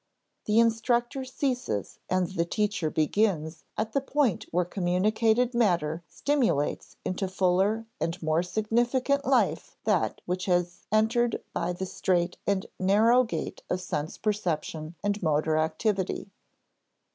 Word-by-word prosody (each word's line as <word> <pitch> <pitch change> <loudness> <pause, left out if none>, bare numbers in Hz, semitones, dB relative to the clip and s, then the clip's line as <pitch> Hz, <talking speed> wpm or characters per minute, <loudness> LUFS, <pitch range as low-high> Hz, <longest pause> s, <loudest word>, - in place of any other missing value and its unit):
The 210 +1 +2
instructor 235 +3 +2
ceases 255 - -2
and 185 0 +2
the 180 -3 0
teacher 200 -2 -1
begins 160 -1 0
at 220 0 -2
the 275 - +2
point 275 - 0
where 175 +1 +1
communicated 215 +7 +1
matter 175 -8 +1
stimulates 250 - 0
into 185 +1 -1
fuller 190 +4 +1
and 165 - -2
more 155 +1 +2
significant 240 +8 +1
life - - +1
that - - +1
which 180 +1 -2
has 175 -1 0
entered 225 +2 +2
by - - -1
the 190 +2 -4
strait 180 -1 0
and 200 -1 +1
narrow 220 +6 +5
gate 170 -10 -4
of 180 - 0
sense 155 -4 -4
perception 170 -6 -2
and 205 +1 0
motor 155 -1 +1
activity. 190 +5 -1
195 Hz, 125 wpm, -28 LUFS, 175-225 Hz, -, narrow